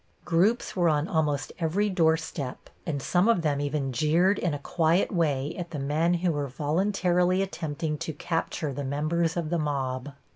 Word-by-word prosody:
Groups 185 +8 +2
were 175 -3 +3
on 150 +1 +1
almost 155 -7 0
every 180 +5 +1
doorstep, 160 -7 -1 0.2
and 150 -4 -1
some 180 +8 +2
of 230 -8 +3
them 145 -2 +1
even 145 -2 -2
jeered 165 - +3
in 175 - 0
a 145 - -2
quiet 165 +4 +1
way 150 -5 0
at 175 -2 -5
the 160 - -5
men 155 +5 +1
who 175 0 +1
were 145 -2 -2
voluntarily 180 +5 +1
attempting 155 -4 -3
to 160 - -4
capture 155 -1 -2
the 145 - -4
members 155 +5 0
of 165 -2 -2
the 170 - +1
mob. 135 -2 -2
160 Hz, 175 wpm, -27 LUFS, 145-175 Hz, 0.2 s, were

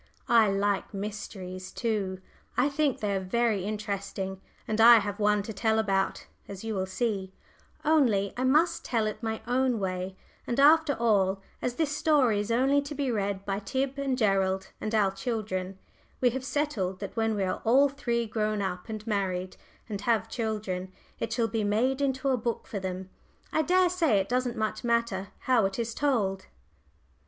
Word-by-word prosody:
I 230 -3 +5
like 200 0 0
mysteries, 190 -2 -6
too 200 -5 -2 0.4
I 255 +3 +3
think 285 -2 0
they 205 -2 0
are - - +1
very 210 +1 0
interesting, 200 -2 -4 0.3
and 215 +1 +1
I 235 +1 +10
have 205 -1 -2
one 210 -1 +3
to 220 - -6
tell 220 +1 +1
about, 195 -3 0 0.2
as 195 0 -8
you 225 -1 -3
will 190 -2 -1
see, 195 -2 -2 0.5
only 235 -11 +3
I 255 - -2
must 305 +6 +3
tell 225 -3 0
it 215 +2 -4
my 220 -1 -3
own 250 0 +1
way, 185 -1 -3 0.3
and 240 - -1
after 305 +1 +6
all, 200 -4 +2 0.2
as 245 - -2
this 300 -1 0
story 290 -8 +3
is 205 +1 -3
only 265 +5 +3
to 285 +1 -7
be 275 -2 -1
read 200 -2 -2
by 195 0 -1
Tib 265 +5 -2
and 270 -2 0
Gerald 190 -3 +1
and 215 +1 -2
our 200 -3 +3
children 195 -4 -3 0.4
we 250 -1 +3
have 260 +2 -4
settled 235 -11 -1
that 200 -2 -6
when 225 -1 +1
we 200 - 0
are 185 - -2
all 265 +5 +5
three 240 -4 -1
grown 215 -1 -1
up 190 +1 -3
and 215 -1 -5
married, 190 -4 -2 0.3
and 205 -3 -4
have 225 0 +1
children, 210 -5 -3 0.3
it - - -3
shall 230 0 +1
be 225 -1 -1
made 245 +7 +1
into 270 0 0
a 260 - +2
book 235 0 -3
for 200 - -4
them 190 0 -5 0.4
I 315 - +3
daresay 355 - +3
it 195 0 0
doesn't 250 -1 0
much 215 +1 -2
matter 235 -5 0
how 240 -6 +3
it 195 - -6
is 230 -1 -2
told. 205 -9 0
220 Hz, 180 wpm, -28 LUFS, 195-250 Hz, 0.5 s, I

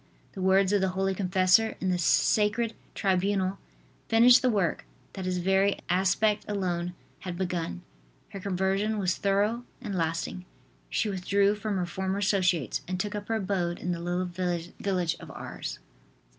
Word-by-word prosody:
The 190 - -7
words 190 +1 +3
of 205 - +3
the 190 - +2
holy 195 0 +1
confessor 190 +3 +3
in 185 - 0
the 180 - 0
sacred 215 +6 +2 0.2
tribunal 195 0 +1 0.5
finished 235 +2 +7
the 255 - +3
work 200 -7 0 0.3
that 190 -2 -5
his 185 0 -1
very 190 +2 +2
aspect 195 +3 +2
alone 180 -3 -2 0.2
had 180 -2 -6
begun. 175 - -3 0.5
Her 195 - -7
conversion 195 +3 0
was 185 -2 +1
thorough 205 +4 +1 0.2
and 220 -6 -5
lasting. 170 +1 -2 0.4
She 225 - 0
withdrew 200 +1 +2
from 210 -1 -3
her 180 - 0
former 190 +2 -2
associates 185 - +1
and 185 0 -3
took 205 +2 -2
up 205 0 -5
her 225 - 0
abode 185 -4 -1
in 180 - -3
the 170 - -2
little 175 +2 -1
village 175 0 -2
of - - -11
Ars. - - -6
190 Hz, 160 wpm, -28 LUFS, 180-205 Hz, 0.5 s, finished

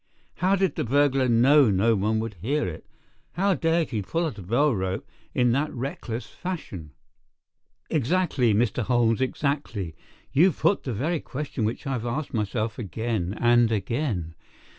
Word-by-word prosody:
"How 190 +2 +3
did 190 -5 +1
the - - 0
burglar 135 +1 +2
know 130 +3 +5
no 105 +4 +3
one 105 +3 +1
would 115 -1 -4
hear 145 +8 0
it? 80 - -8 0.5
How 195 +2 +2
dared 165 0 +1
he 110 -4 -1
pull 165 - -1
at 140 -10 -4
a - - -7
bell 120 +10 +2
rope 95 -2 -3 0.3
in 125 -1 +3
that 140 +5 0
reckless 125 -2 -5
fashion?" 100 - -7 0.9
"Exactly, 150 -4 +1
Mr. 110 +3 +1
Holmes, 120 0 +2
exactly. 130 - -2 0.4
You 170 +6 +5
put 170 +8 +1
the 130 - -2
very 155 +10 -1
question 135 -5 -4
which 110 +6 -3
I 135 - -2
have 120 -3 -2
asked 140 +4 -3
myself 110 +1 -2
again 110 -2 -3
and 120 -1 +4
again. 105 - -2
120 Hz, 160 wpm, -25 LUFS, 110-150 Hz, 0.9 s, know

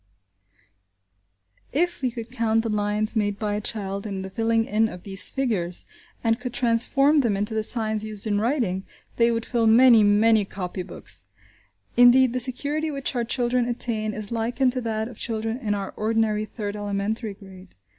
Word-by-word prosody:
If 350 +4 -1
we 255 - +1
could 230 -1 -8
count 225 -2 0
the 230 - -2
lines 210 +1 0
made 205 -2 0
by 210 -1 -2
a 210 - -2
child 200 -1 -4
in 195 -2 -5
the 190 - -8
filling 225 +1 +1
in 220 +1 +1
of 180 -3 -10
these 195 -2 +1
figures, 205 -10 -2 0.4
and 225 0 +1
could 245 -1 -6
transform 255 +5 +3
them 220 -6 0
into 210 +2 -1
the 220 - 0
signs 215 -1 +5
used 215 -1 +1
in 205 -2 0
writing, 225 -7 -1 0.3
they 235 0 +4
would 230 -1 -2
fill 235 -2 0
many, 230 0 +6
many 210 +1 +4
copy 185 -2 -6
books! 100 - -5 0.7
Indeed, 245 0 +6
the 255 - -1
security 285 +5 -2
which 275 -3 -4
our 240 - 0
children 245 +1 0
attain 220 -3 -3
is 215 0 -6
likened 240 +3 0
to 255 0 -2
that 220 -1 -2
of 235 -2 -12
children 225 +1 -3
in 210 -5 -1
our 195 -1 -5
ordinary 215 -1 0
third 210 -2 -6
elementary 205 +1 -3
grade. 190 -2 -15
225 Hz, 175 wpm, -24 LUFS, 205-240 Hz, 0.7 s, many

